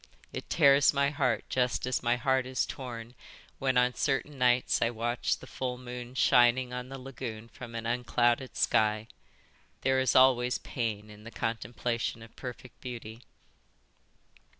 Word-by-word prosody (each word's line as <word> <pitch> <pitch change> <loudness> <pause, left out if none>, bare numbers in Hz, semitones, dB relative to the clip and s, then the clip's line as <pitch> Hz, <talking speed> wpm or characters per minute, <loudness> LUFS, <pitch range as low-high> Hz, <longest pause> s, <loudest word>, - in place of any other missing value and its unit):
It - - -6
tears 140 -2 +5
my 140 0 +2
heart 130 -7 0
just 125 -1 0
as 130 -1 0
my 120 0 +2
heart 130 +1 +1
is 130 0 0
torn 120 -2 -7 0.5
when 130 -1 +1
on 125 0 +4
certain 135 +1 -1
nights 125 0 +3
I 115 - +3
watch 120 +1 -1
the - - -12
full 125 -1 -4
moon 125 0 -8
shining 125 0 +4
on 125 0 -5
the 135 - -6
lagoon 125 -4 -7
from 120 -1 -10
an 115 0 -4
unclouded 120 +1 +1
sky. 110 0 +2 0.7
There 130 0 +2
is 130 - +2
always 125 -1 +5
pain 110 -3 -4
in 105 0 -14
the 115 - -8
contemplation 115 0 -3
of 115 - -15
perfect 125 0 -9
beauty." 115 -2 -7
125 Hz, 150 wpm, -30 LUFS, 115-130 Hz, 0.7 s, tears